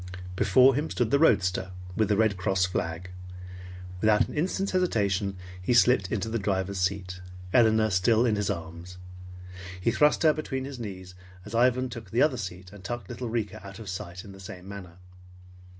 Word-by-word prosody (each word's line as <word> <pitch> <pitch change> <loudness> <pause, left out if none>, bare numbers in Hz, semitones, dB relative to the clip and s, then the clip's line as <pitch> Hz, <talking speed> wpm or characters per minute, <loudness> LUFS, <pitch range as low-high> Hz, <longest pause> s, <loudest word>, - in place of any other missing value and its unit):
Before 125 +8 +5
him 150 +5 -1
stood 120 -2 -1
the 140 - +4
roadster, 95 - +2 0.2
with 110 -2 +1
the 105 - +2
Red 110 -2 +3
Cross 95 0 +1
flag. 90 0 -4 0.9
Without 110 -1 +4
an - - -9
instant's 190 +5 -1
hesitation, 100 - 0 0.2
he 120 +7 +1
slipped 120 -5 +4
into 105 -1 -1
the 115 +1 -2
driver's 95 -1 -1
seat, 90 -1 -2 0.3
Elinor 110 -2 +4
still 110 +6 +3
in 110 -3 +2
his 105 -1 -1
arms. 85 0 -6 0.8
He 105 +6 +1
thrust 150 +6 +3
her 155 -1 +6
between 135 -4 -4
his 135 -2 -7
knees, 95 -5 -7 0.3
as 105 - -10
Ivan 125 +2 +3
took 115 -5 -9
the 115 - +3
other 145 -4 +2
seat, 90 -2 -7
and 100 -2 -13
tucked 110 0 -5
little 125 -2 -5
Rika 110 -4 -3
out 100 0 -10
of 110 -4 -8
sight 90 -1 -6
in 100 - -10
the 95 - -13
same 95 -1 -10
manner. 95 -4 -9
105 Hz, 180 wpm, -27 LUFS, 95-120 Hz, 0.9 s, her